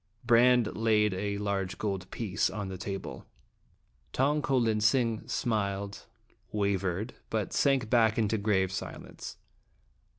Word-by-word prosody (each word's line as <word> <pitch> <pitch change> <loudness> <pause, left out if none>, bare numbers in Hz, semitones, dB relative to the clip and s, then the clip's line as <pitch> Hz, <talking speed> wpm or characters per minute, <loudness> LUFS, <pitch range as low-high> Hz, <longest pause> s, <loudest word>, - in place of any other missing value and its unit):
Brande 120 -1 +4
laid 105 -2 +3
a 100 +2 -2
large 100 -3 -2
gold 95 -2 -3
piece 100 -5 -1
on 100 0 -4
the 95 - -5
table. 95 -1 -6 0.9
Tong 145 +3 +2
ko 135 -2 +1
lin 110 -3 +2
sing 115 0 +2
smiled, 100 -4 -2 0.4
wavered, 100 +1 -1 0.2
but 110 -3 -2
sank 135 -5 +2
back 110 -2 +3
into 110 -1 +1
grave 95 -3 +1
silence. 95 - -7
105 Hz, 125 wpm, -30 LUFS, 100-115 Hz, 0.9 s, Brande